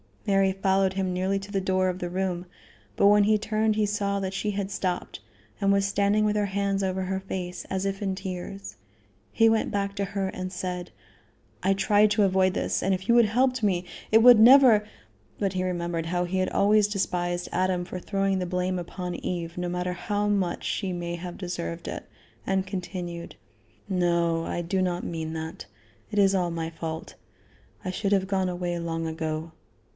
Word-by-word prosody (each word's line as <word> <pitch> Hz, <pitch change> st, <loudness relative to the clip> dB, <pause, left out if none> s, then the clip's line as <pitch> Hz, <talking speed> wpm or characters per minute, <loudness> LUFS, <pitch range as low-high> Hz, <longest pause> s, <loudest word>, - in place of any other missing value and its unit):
Mary 195 Hz, -1 st, +3 dB
followed 190 Hz, 0 st, +1 dB
him 190 Hz, -1 st, -1 dB
nearly 190 Hz, +2 st, 0 dB
to 195 Hz, +1 st, -7 dB
the 195 Hz, -, 0 dB
door 185 Hz, 0 st, +1 dB
of 180 Hz, 0 st, -4 dB
the 175 Hz, -, -3 dB
room, 180 Hz, -1 st, -2 dB, 0.5 s
but 200 Hz, -, +4 dB
when 205 Hz, 0 st, +6 dB
he 215 Hz, +1 st, +4 dB
turned 215 Hz, 0 st, 0 dB
he 215 Hz, 0 st, +2 dB
saw 200 Hz, -1 st, -1 dB
that 190 Hz, -1 st, -3 dB
she 210 Hz, +2 st, -1 dB
had 200 Hz, -1 st, -3 dB
stopped, 180 Hz, -2 st, -3 dB, 0.4 s
and 200 Hz, 0 st, +2 dB
was 200 Hz, 0 st, +3 dB
standing 200 Hz, +1 st, +2 dB
with 210 Hz, 0 st, +1 dB
her 210 Hz, -1 st, +1 dB
hands 200 Hz, 0 st, -1 dB
over 190 Hz, 0 st, -1 dB
her 190 Hz, +1 st, -2 dB
face, 180 Hz, -2 st, -5 dB
as 190 Hz, 0 st, -2 dB
if 195 Hz, 0 st, -2 dB
in 195 Hz, -2 st, -1 dB
tears. 190 Hz, +1 st, -6 dB, 0.5 s
He 225 Hz, 0 st, +4 dB
went 225 Hz, 0 st, +1 dB
back 200 Hz, 0 st, -2 dB
to 200 Hz, -1 st, -1 dB
her 195 Hz, 0 st, -2 dB
and 185 Hz, 0 st, -5 dB
said: 180 Hz, -1 st, -4 dB, 0.7 s
"I 195 Hz, +1 st, +3 dB
tried 205 Hz, +2 st, +3 dB
to 210 Hz, 0 st, +3 dB
avoid 190 Hz, -1 st, +3 dB
this, -, -, -1 dB
and 190 Hz, -, +1 dB
if 190 Hz, +2 st, -4 dB
you 235 Hz, -, +6 dB
had 235 Hz, -2 st, +6 dB
helped 255 Hz, +3 st, +1 dB
me, 185 Hz, -4 st, +1 dB, 0.3 s
it 220 Hz, -, +7 dB
would 240 Hz, -1 st, +8 dB
never 235 Hz, -3 st, +7 dB, 0.2 s
" 105 Hz, 0 st, -35 dB
But 195 Hz, -2 st, 0 dB
he 185 Hz, 0 st, -1 dB
remembered 170 Hz, -2 st, -2 dB
how 175 Hz, +1 st, 0 dB
he 185 Hz, +2 st, -2 dB
had 185 Hz, -, +1 dB
always 210 Hz, +1 st, +4 dB
despised 175 Hz, -3 st, -2 dB
Adam 185 Hz, 0 st, 0 dB
for 180 Hz, +1 st, -6 dB
throwing 195 Hz, 0 st, 0 dB
the 180 Hz, -, -1 dB
blame 180 Hz, 0 st, -1 dB
upon 180 Hz, +1 st, -5 dB
Eve, 170 Hz, -1 st, -4 dB
no 180 Hz, 0 st, -2 dB
matter 180 Hz, +1 st, -2 dB
how 205 Hz, +3 st, -1 dB
much 195 Hz, -4 st, 0 dB
she 190 Hz, -3 st, -2 dB
may 175 Hz, 0 st, -3 dB
have 175 Hz, 0 st, -7 dB
deserved 175 Hz, -, -5 dB
it, -, -, -6 dB, 0.4 s
and 190 Hz, 0 st, +1 dB
continued: 180 Hz, -2 st, -6 dB, 0.5 s
"No; 170 Hz, -3 st, +1 dB
I 175 Hz, -, -2 dB
do 185 Hz, +3 st, -1 dB
not 180 Hz, -1 st, -1 dB
mean 160 Hz, -1 st, -4 dB
that. 160 Hz, -4 st, -6 dB, 0.4 s
It 210 Hz, -, -5 dB
is 195 Hz, -1 st, +5 dB
all 180 Hz, -2 st, +1 dB
my 165 Hz, -1 st, -3 dB
fault. 160 Hz, 0 st, -6 dB, 0.7 s
I 185 Hz, -, -1 dB
should 200 Hz, +2 st, 0 dB
have 190 Hz, -1 st, +2 dB
gone 190 Hz, -2 st, 0 dB
away 175 Hz, -1 st, -3 dB
long 165 Hz, -1 st, -3 dB
ago. 160 Hz, 0 st, -3 dB
190 Hz, 200 wpm, -26 LUFS, 175-200 Hz, 0.7 s, would